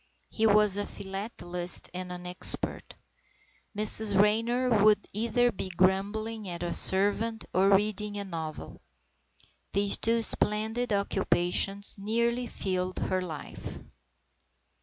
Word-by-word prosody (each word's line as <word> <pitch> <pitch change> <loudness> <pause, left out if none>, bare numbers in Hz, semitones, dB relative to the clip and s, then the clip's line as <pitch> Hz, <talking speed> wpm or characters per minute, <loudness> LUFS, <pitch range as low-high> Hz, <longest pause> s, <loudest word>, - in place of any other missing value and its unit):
He 220 0 0
was 210 -1 +2
a 205 - -3
philatelist 185 -3 -3
and 180 0 -7
an 180 0 -9
expert. 180 0 +3 0.8
Mrs 210 -1 +4
Raynor 230 +2 +1
would 210 -1 +2
either 235 +3 0
be 190 - -6
grumbling 200 +4 -2
at 175 0 -7
a 175 - -4
servant 205 +3 +3
or 190 +2 +2
reading 210 +1 -2
a 200 - -3
novel. 160 -5 -9 0.9
These 200 0 +1
two 230 0 +1
splendid 220 +3 +1
occupations 195 0 +1
nearly 235 +4 -2
filled 185 -3 -4
her 185 0 -3
life. 160 -5 -9
205 Hz, 115 wpm, -27 LUFS, 185-220 Hz, 0.9 s, Mrs